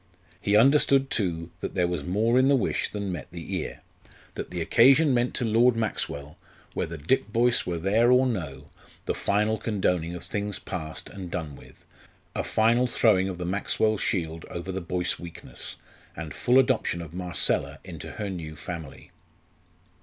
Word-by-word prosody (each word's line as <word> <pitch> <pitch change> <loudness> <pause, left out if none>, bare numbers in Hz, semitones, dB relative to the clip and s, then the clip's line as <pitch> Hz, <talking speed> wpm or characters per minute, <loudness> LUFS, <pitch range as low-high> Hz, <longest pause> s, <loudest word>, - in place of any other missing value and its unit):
He 100 0 +2
understood, 135 +3 +5
too, 85 -4 -1
that - - -5
there 90 -2 +2
was 85 -4 -2
more 110 - +2
in 130 - +4
the 140 - +5
wish 130 - 0
than 100 -2 -4
met 90 - -5
the 85 +2 -7
ear; 80 - -5 0.5
that - - -6
the 90 - -4
occasion 135 - +5
meant 120 0 +1
to 125 - -1
Lord 115 +2 +4
Maxwell, 75 -10 -3 0.4
whether 85 0 -3
Dick 100 - 0
Boyce 120 +2 +3
were 85 -1 -1
there 105 +8 +3
or 125 +1 +5
no, 85 - -3 0.4
the - - 0
final 105 +2 +1
condoning 90 -6 0
of 90 - -7
things 105 -1 -2
past 80 -3 -6
and 95 -3 -7
done 80 -5 -4
with, - - -17 0.5
a - - 0
final 115 +3 +3
throwing 100 -5 +3
of 90 - -5
the 90 - -4
Maxwell 105 +3 +1
shield 80 -3 -1
over 85 +2 -5
the 95 +1 -3
Boyce 90 0 -1
weakness, 85 -1 -8 0.4
and 80 -1 -6
full 125 +2 +3
adoption 125 -9 +2
of 85 -1 -11
Marcella 90 -1 0
into - - -8
her 105 - -4
new 80 -4 -6
family. 80 -2 -8
95 Hz, 170 wpm, -26 LUFS, 85-115 Hz, 0.5 s, understood